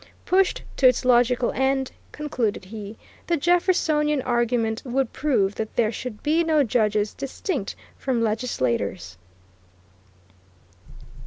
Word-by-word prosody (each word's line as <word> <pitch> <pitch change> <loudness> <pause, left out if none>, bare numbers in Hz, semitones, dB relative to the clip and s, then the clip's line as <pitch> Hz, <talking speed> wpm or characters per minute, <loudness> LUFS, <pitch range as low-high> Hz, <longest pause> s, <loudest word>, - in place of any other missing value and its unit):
Pushed 380 0 +2
to 265 - +6
its 250 0 +2
logical 245 0 +3
end, 265 0 0 0.2
concluded 250 -10 -2
he, 210 +1 -8 0.3
the 340 - +2
Jeffersonian 310 -3 +2
argument 235 -2 0
would 260 -1 -1
prove 210 -10 +1
that 220 0 -5
there 225 -2 +2
should 235 -2 -7
be 320 +3 +2
no 315 -3 +3
judges 215 -3 +1
distinct 275 - -4 0.2
from 260 -3 0
legislatures. 115 - -2
245 Hz, 110 wpm, -24 LUFS, 215-290 Hz, 0.3 s, to